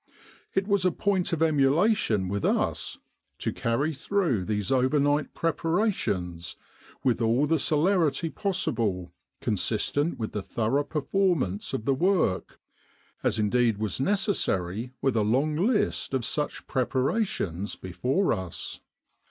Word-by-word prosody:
It 195 Hz, +1 st, +1 dB
was 200 Hz, -3 st, +2 dB
a 185 Hz, -, +3 dB
point 190 Hz, 0 st, 0 dB
of 165 Hz, -1 st, +1 dB
emulation 145 Hz, -, +3 dB
with 100 Hz, +1 st, -2 dB
us -, -, 0 dB, 0.4 s
to -, -, -2 dB
carry 135 Hz, +7 st, 0 dB
through 140 Hz, -, 0 dB
these 105 Hz, -2 st, -2 dB
overnight 145 Hz, +3 st, +2 dB
preparations 160 Hz, -, -1 dB, 0.5 s
with 125 Hz, -2 st, +2 dB
all 115 Hz, +5 st, +3 dB
the 160 Hz, +1 st, +2 dB
celerity 160 Hz, 0 st, +2 dB
possible, 105 Hz, -, -1 dB, 0.3 s
consistent 115 Hz, -, 0 dB
with 110 Hz, -2 st, -3 dB
the 105 Hz, -, -3 dB
thorough 115 Hz, +8 st, 0 dB
performance 150 Hz, -, 0 dB
of 110 Hz, -, -3 dB
the 135 Hz, -, +3 dB
work, 175 Hz, -, +1 dB, 0.6 s
as -, -, +1 dB
indeed 110 Hz, +1 st, +2 dB
was 110 Hz, +1 st, -2 dB
necessary 125 Hz, -, 0 dB
with 135 Hz, -3 st, +2 dB
a 110 Hz, -, +3 dB
long 135 Hz, +9 st, +1 dB
list 205 Hz, -, +1 dB
of 125 Hz, -3 st, 0 dB
such 150 Hz, -1 st, -2 dB
preparations 130 Hz, -, -1 dB
before 130 Hz, -, 0 dB
us. 95 Hz, -5 st, -5 dB
135 Hz, 125 wpm, -27 LUFS, 110-170 Hz, 0.6 s, a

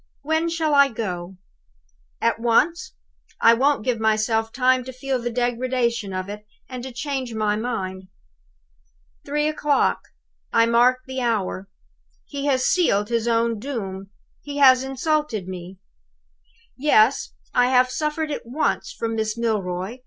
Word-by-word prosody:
When 320 Hz, +3 st, 0 dB
shall 325 Hz, -2 st, 0 dB
I 280 Hz, -1 st, +6 dB
go? 190 Hz, -6 st, -5 dB, 0.8 s
At 230 Hz, -, +1 dB
once! 330 Hz, +11 st, +1 dB, 0.5 s
I 230 Hz, -, +6 dB
won't 270 Hz, 0 st, +1 dB
give 245 Hz, -3 st, 0 dB
myself 220 Hz, +1 st, +1 dB
time 255 Hz, +1 st, +2 dB
to 260 Hz, -, -6 dB
feel 260 Hz, +1 st, -3 dB
the 240 Hz, -, -2 dB
degradation 240 Hz, -2 st, -1 dB
of 185 Hz, 0 st, -4 dB
it, 210 Hz, +1 st, -7 dB, 0.2 s
and 255 Hz, -2 st, -7 dB
to 260 Hz, +1 st, -7 dB
change 260 Hz, -1 st, -4 dB
my 210 Hz, -1 st, +1 dB
mind." 190 Hz, -5 st, -4 dB, 1.2 s
"Three 300 Hz, +2 st, 0 dB
'clock. 295 Hz, -2 st, +1 dB, 0.5 s
I 230 Hz, -, +4 dB
mark 240 Hz, +2 st, +3 dB
the 260 Hz, 0 st, -4 dB
hour. 200 Hz, -5 st, -1 dB, 0.6 s
He 285 Hz, -1 st, -4 dB
has 260 Hz, -2 st, +2 dB
sealed 210 Hz, -, +2 dB
his 235 Hz, -1 st, 0 dB
own 230 Hz, -1 st, +1 dB
doom. 195 Hz, -7 st, -5 dB, 0.3 s
He 290 Hz, 0 st, -7 dB
has 260 Hz, -2 st, +6 dB
insulted 270 Hz, -, -1 dB
me. 185 Hz, 0 st, -8 dB, 1.0 s
"Yes! 260 Hz, -3 st, +3 dB, 0.2 s
I 245 Hz, 0 st, +4 dB
have 255 Hz, 0 st, +3 dB
suffered 305 Hz, +2 st, -2 dB
it -, -, -3 dB
once 265 Hz, +7 st, -1 dB
from 225 Hz, 0 st, -3 dB
Miss 220 Hz, 0 st, -2 dB
Milroy. 205 Hz, -1 st, -2 dB
240 Hz, 140 wpm, -23 LUFS, 220-275 Hz, 1.2 s, I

